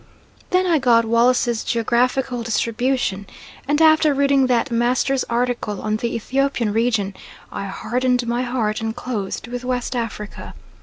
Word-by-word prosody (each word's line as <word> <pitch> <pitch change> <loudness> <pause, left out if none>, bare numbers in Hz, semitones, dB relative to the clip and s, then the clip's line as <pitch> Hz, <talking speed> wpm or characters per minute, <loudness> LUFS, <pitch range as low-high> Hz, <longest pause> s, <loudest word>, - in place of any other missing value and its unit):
Then 365 0 +2
I 335 -4 +3
got 235 -3 +4
Wallace's 235 0 +2
Geographical 245 +2 0
Distribution 230 -3 -1 0.4
and 295 +1 +1
after 315 -2 +5
reading 275 -1 +3
that 245 -1 +1
master's 250 +3 +1
article 235 -3 -2
on 215 0 -1
the 235 +1 -3
Ethiopian 245 -2 -1
region 220 -3 0 0.4
I 200 - -5
hardened 250 +5 -1
my 240 +1 0
heart 240 -4 -1
and 225 0 -3
closed 230 -6 -4
with 245 +1 -5
West 250 0 -2
Africa. 225 -3 -5
245 Hz, 140 wpm, -21 LUFS, 230-255 Hz, 0.4 s, after